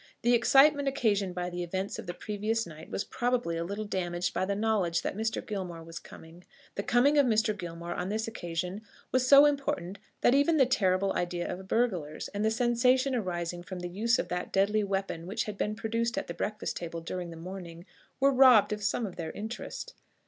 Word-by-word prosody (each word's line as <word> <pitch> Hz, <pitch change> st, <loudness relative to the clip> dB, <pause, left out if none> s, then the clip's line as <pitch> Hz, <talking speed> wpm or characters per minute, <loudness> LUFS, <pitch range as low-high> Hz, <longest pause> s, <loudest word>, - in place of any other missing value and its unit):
The 240 Hz, +1 st, +4 dB
excitement 280 Hz, +4 st, +5 dB
occasioned 205 Hz, -8 st, +1 dB
by 180 Hz, 0 st, -3 dB
the 175 Hz, 0 st, -4 dB
events 185 Hz, +3 st, -3 dB
of -, -, -8 dB
the 175 Hz, -, -4 dB
previous 215 Hz, +3 st, -2 dB
night 160 Hz, 0 st, -11 dB
was -, -, -2 dB
probably 245 Hz, -8 st, -1 dB
a 165 Hz, -, -2 dB
little 200 Hz, +5 st, -4 dB
damaged 175 Hz, -3 st, -2 dB
by -, -, 0 dB
the 200 Hz, +1 st, -1 dB
knowledge 205 Hz, -6 st, +1 dB
that -, -, -2 dB
Mr. 220 Hz, +1 st, -2 dB
Gilmore 180 Hz, -5 st, -5 dB
was 165 Hz, +1 st, -8 dB
coming. 165 Hz, +2 st, -14 dB, 0.3 s
The -, -, -2 dB
coming 270 Hz, +7 st, +3 dB
of 280 Hz, -, +4 dB
Mr. 220 Hz, -1 st, +2 dB
Gilmore 170 Hz, -2 st, -6 dB
on 180 Hz, +2 st, -3 dB
this 220 Hz, +2 st, -2 dB
occasion 180 Hz, -1 st, -4 dB, 0.3 s
was 255 Hz, 0 st, +2 dB
so 280 Hz, +2 st, +9 dB
important 275 Hz, -10 st, -1 dB, 0.2 s
that 245 Hz, -, +5 dB
even 285 Hz, +4 st, +4 dB
the 265 Hz, -, +6 dB
terrible 195 Hz, -5 st, +1 dB
idea 175 Hz, 0 st, -2 dB
of 190 Hz, +1 st, -6 dB
burglars, 185 Hz, -11 st, -1 dB
and 205 Hz, +1 st, -3 dB
the 220 Hz, -, +3 dB
sensation 250 Hz, +3 st, +2 dB
arising 175 Hz, -6 st, -2 dB
from 180 Hz, 0 st, -7 dB
the 175 Hz, -, -4 dB
use 225 Hz, +6 st, +1 dB
of -, -, -2 dB
that 180 Hz, 0 st, -3 dB
deadly 210 Hz, +2 st, +2 dB
weapon 195 Hz, -4 st, -3 dB
which 215 Hz, +5 st, -1 dB
had 210 Hz, -, -5 dB
been 210 Hz, +1 st, -2 dB
produced 230 Hz, +4 st, -2 dB
at 290 Hz, -, -1 dB
the 170 Hz, -, -6 dB
breakfast 210 Hz, +5 st, -3 dB
table 170 Hz, -1 st, -5 dB
during 175 Hz, +1 st, -5 dB
the 165 Hz, -, -9 dB
morning, 175 Hz, -1 st, -8 dB, 0.3 s
were 275 Hz, +1 st, +4 dB
robbed 255 Hz, -6 st, +6 dB
of 210 Hz, -, -5 dB
some 220 Hz, +3 st, 0 dB
of 190 Hz, -, -7 dB
their 165 Hz, -2 st, -4 dB
interest. 230 Hz, -, -6 dB
200 Hz, 205 wpm, -29 LUFS, 175-235 Hz, 0.3 s, so